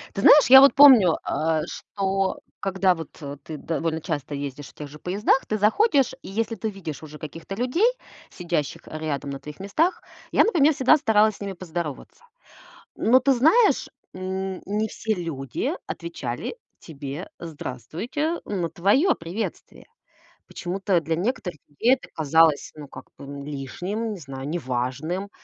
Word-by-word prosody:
Ты 195 Hz, -, -2 dB
знаешь, 295 Hz, +8 st, +8 dB
я 265 Hz, +1 st, +11 dB
вот 275 Hz, -, +7 dB
помню, 250 Hz, -, +8 dB
а 160 Hz, 0 st, 0 dB
что 195 Hz, -1 st, -2 dB, 0.2 s
когда 190 Hz, -2 st, +2 dB
вот 160 Hz, -2 st, -8 dB, 0.3 s
ты 155 Hz, -, -7 dB
довольно 160 Hz, +1 st, -2 dB
часто 150 Hz, -4 st, -4 dB
ездишь 140 Hz, 0 st, -6 dB
в -, -, -20 dB
тех 150 Hz, -, -8 dB
же 150 Hz, +2 st, -12 dB
поездах, 200 Hz, -, +1 dB
ты 215 Hz, -, -1 dB
заходишь, 275 Hz, -, +3 dB
и -, -, -10 dB
если 225 Hz, +3 st, -2 dB
ты 220 Hz, +1 st, -3 dB
видишь 170 Hz, -8 st, -7 dB
уже 150 Hz, -1 st, -10 dB
каких-то 165 Hz, +5 st, -8 dB
людей, 250 Hz, -, +1 dB, 0.4 s
сидящих 170 Hz, -5 st, -3 dB
рядом 155 Hz, -3 st, -4 dB
на 135 Hz, -, -6 dB
твоих 150 Hz, -1 st, -10 dB
местах, 305 Hz, -, 0 dB, 0.3 s
я, -, -, +5 dB
например, 315 Hz, -8 st, +4 dB
всегда 265 Hz, +2 st, +5 dB
старалась 220 Hz, -7 st, +3 dB
с -, -, -17 dB
ними 200 Hz, -1 st, -4 dB
поздороваться. 175 Hz, -, -6 dB, 0.7 s
Но 245 Hz, +4 st, +4 dB
ты 270 Hz, +2 st, +3 dB
знаешь, 320 Hz, -, +4 dB, 0.3 s
н 190 Hz, 0 st, -4 dB
не 210 Hz, +2 st, 0 dB
все 220 Hz, +1 st, -2 dB
люди 145 Hz, -, -3 dB, 0.2 s
отвечали 170 Hz, -, -5 dB, 0.2 s
тебе 145 Hz, +2 st, -7 dB
"здравствуйте" 170 Hz, -, -4 dB
на 180 Hz, -5 st, -2 dB
твоё 210 Hz, -, +3 dB
приветствие. 175 Hz, +7 st, -6 dB, 0.6 s
Почему-то 190 Hz, 0 st, -1 dB
для 160 Hz, +1 st, -2 dB
некоторых 180 Hz, -, -2 dB
людей 230 Hz, -, +3 dB
это 265 Hz, -, -13 dB
казалось 160 Hz, 0 st, +3 dB
ну 150 Hz, -1 st, -9 dB
как -, -, -12 dB
бы, -, -, -10 dB
м, 140 Hz, 0 st, -8 dB
лишним, 175 Hz, -, -4 dB
не 205 Hz, -, -6 dB
знаю, 135 Hz, -2 st, -7 dB
неважным. 150 Hz, +5 st, -3 dB
180 Hz, 155 wpm, -24 LUFS, 150-220 Hz, 0.7 s, я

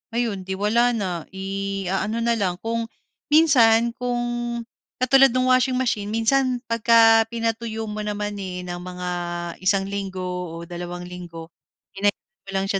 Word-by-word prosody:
Ayun, 205 Hz, -6 st, -1 dB
'di 190 Hz, -, -2 dB
wala 235 Hz, +4 st, +2 dB
na. 205 Hz, -3 st, -1 dB, 0.3 s
Iaano 195 Hz, +3 st, -2 dB
na 235 Hz, -, +2 dB
lang, 180 Hz, -3 st, 0 dB
kung 230 Hz, 0 st, -2 dB, 0.4 s
minsan 235 Hz, -7 st, +5 dB
kung 245 Hz, 0 st, -2 dB, 0.8 s
katulad 270 Hz, +2 st, +5 dB
no'ng 255 Hz, 0 st, +3 dB
washing 255 Hz, 0 st, +3 dB
machine, 220 Hz, -5 st, 0 dB
minsan 245 Hz, +3 st, +1 dB
pagka 225 Hz, -1 st, +5 dB
pinatuyo 225 Hz, -1 st, -3 dB
mo 215 Hz, -, -5 dB
naman, 210 Hz, -1 st, -3 dB
eh, 180 Hz, -1 st, -5 dB
ng 175 Hz, 0 st, -5 dB
mga 180 Hz, 0 st, -6 dB, 0.5 s
isang 195 Hz, +1 st, +2 dB
linggo 195 Hz, -2 st, -4 dB
o 180 Hz, -2 st, -5 dB
dalawang 175 Hz, +1 st, -6 dB
linggo, 175 Hz, -2 st, -9 dB, 0.4 s
pinainit 200 Hz, +1 st, +1 dB, 0.3 s
mo -, -, -10 dB
lang 195 Hz, 0 st, +1 dB
siya 195 Hz, -, 0 dB
210 Hz, 145 wpm, -23 LUFS, 190-235 Hz, 0.8 s, minsan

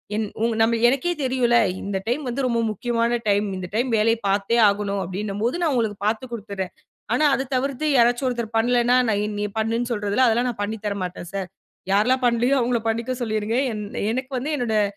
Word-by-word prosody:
என் 215 Hz, 0 st, -1 dB, 0.2 s
உங் 230 Hz, -1 st, +1 dB
நம்ம 230 Hz, +1 st, +3 dB
எனக்கே 275 Hz, +7 st, 0 dB
தெரியும்ல, 250 Hz, -2 st, +2 dB, 0.2 s
இந்த 200 Hz, -1 st, -3 dB
டைம் 250 Hz, +6 st, 0 dB
வந்து 260 Hz, +2 st, -1 dB
ரொம்ப 235 Hz, -2 st, 0 dB
முக்கியமான 235 Hz, +2 st, 0 dB
டைம். 205 Hz, +1 st, +2 dB
இந்த 185 Hz, -1 st, -5 dB
டைம் 245 Hz, +3 st, +1 dB
வேலைய 225 Hz, +2 st, +3 dB
பார்த்தே 200 Hz, +4 st, +1 dB
ஆகணும் 200 Hz, -1 st, -2 dB
அப்பிடின்னும் 200 Hz, +3 st, -4 dB
போது, 250 Hz, +8 st, 0 dB
நான் 315 Hz, -4 st, +2 dB
உங்களுக்கு 220 Hz, -4 st, 0 dB
பார்த்து 230 Hz, +3 st, -2 dB
கொடுத்துறேன். 200 Hz, -4 st, -5 dB, 0.4 s
ஆனா, 305 Hz, -, +3 dB
அத 265 Hz, 0 st, -3 dB
தவிர்த்து 275 Hz, +3 st, -1 dB
யாராச்சும் 240 Hz, +2 st, +3 dB
ஒருத்தர் 235 Hz, -2 st, -4 dB
பண்லேன்னா, 245 Hz, +1 st, +3 dB
நான் 210 Hz, 0 st, 0 dB
நீ 205 Hz, -, 0 dB
பண்ணுன்னு 230 Hz, +2 st, -1 dB
சொல்றதில 210 Hz, +4 st, +1 dB
அதெல்லாம் 240 Hz, +2 st, +2 dB
நான் 225 Hz, -4 st, -5 dB
பண்ணித் 215 Hz, +1 st, -5 dB
தரமாட்டேன் 185 Hz, -4 st, -4 dB
சார். 195 Hz, -2 st, -3 dB, 0.4 s
யாரெல்லாம் 250 Hz, +6 st, +3 dB
பண்ணலயோ! 240 Hz, +3 st, +3 dB
அவுங்கள 240 Hz, -1 st, +1 dB
பண்ணிக்க 230 Hz, +3 st, -1 dB
சொல்லிருங்க, 215 Hz, -1 st, -1 dB, 0.2 s
என் 210 Hz, -1 st, -4 dB, 0.3 s
எனக்கு 260 Hz, +3 st, -3 dB
வந்து 260 Hz, +5 st, -3 dB
என்னோடய 220 Hz, -5 st, +1 dB
230 Hz, 185 wpm, -23 LUFS, 210-245 Hz, 0.4 s, நம்ம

